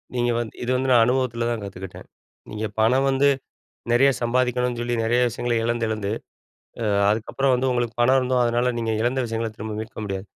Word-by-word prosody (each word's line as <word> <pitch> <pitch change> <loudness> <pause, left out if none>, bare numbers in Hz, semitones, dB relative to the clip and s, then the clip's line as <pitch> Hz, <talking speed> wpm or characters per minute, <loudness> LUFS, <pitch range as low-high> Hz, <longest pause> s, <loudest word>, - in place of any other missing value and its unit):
நீங்க 120 0 +1
வந்து 115 -2 -4
இது 125 - -1
வந்து 130 +1 0
நான் 120 -2 +6
அனுபவத்தில 125 -2 0
தான் 115 -2 -3
கத்துக்கிட்டேன். 95 -1 -9 0.4
நீங்க 110 +1 -4
பணம் 125 +5 +3
வந்து 135 +1 +3 0.6
நிறைய 130 +4 +5
சம்பாதிக்கணும்னு 125 0 0
சொல்லி, 120 0 -1
நிறைய 120 +2 +2
விஷயங்கள 120 +1 -2
இழந்து 115 0 0
இழந்து. 105 -2 -2 0.7
அ - - -1 0.2
அதுக்கப்புறம் 130 +5 +1
வந்து 130 +1 0
உங்களுக்கு 120 -1 -1
பணம் 130 +3 +5
இருந்தும், 125 -1 +1
அதனால 120 +1 +1
நீங்க 115 -1 -1
இழந்த 125 +3 0
விஷயங்கள 115 0 -2
திரும்ப 110 +1 -6
மீட்க 110 - -10
முடியாது. 95 -1 -4
120 Hz, 180 wpm, -23 LUFS, 115-125 Hz, 0.7 s, நான்